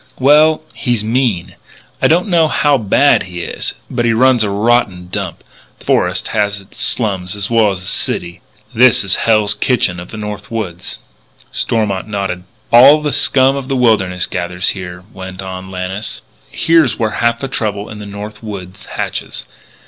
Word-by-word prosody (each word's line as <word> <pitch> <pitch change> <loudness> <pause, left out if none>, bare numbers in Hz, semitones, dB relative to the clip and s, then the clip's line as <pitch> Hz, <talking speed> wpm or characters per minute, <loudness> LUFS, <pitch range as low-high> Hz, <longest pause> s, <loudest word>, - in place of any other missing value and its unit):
"Well, 155 +4 +4
he's 120 -5 -1
mean. 110 -5 -1 0.4
I - - +5
don't 175 +5 +2
know 170 -4 +3
how 145 -1 +2
bad 135 +4 +3
he 90 -2 -6
is. - - -4
But 120 - -2
he 115 -1 +2
runs 125 0 +4
a 105 - -1
rotten 100 -4 +1
dump. 90 -3 -5 0.3
The - - -18
forest - - +1
has 105 -1 0
its 100 0 -12
slums 100 -4 -1
as 105 +2 -2
well 115 -2 +4
as 95 -2 -4
the - - -11
city. 85 -1 -2 0.3
This 125 -1 +5
is 95 - 0
the - - 0
Hell's 110 -2 +3
Kitchen 100 -9 0
of 90 - -9
the 110 - -8
North 105 -1 -6
Woods." 95 -6 -5 0.5
Stormont 105 -4 -1
nodded. 95 -3 -3 0.3
"All 140 +6 +8
the 150 - 0
scum 135 0 +4
of 135 -2 -5
the 135 - -1
wilderness 100 -7 +2
gathers 90 +1 -1
here," 90 -2 -6
went 95 0 -8
on 95 0 -7
Lannis. 95 +3 -5 0.3
"Here's 160 -9 +2
where 110 -2 0
half 115 0 +2
the 135 - -3
trouble 105 -5 -3
in 105 - -9
the 105 - -8
North 105 +1 -8
Woods 95 -4 -8
hatches. - - -4
105 Hz, 175 wpm, -15 LUFS, 95-120 Hz, 0.5 s, All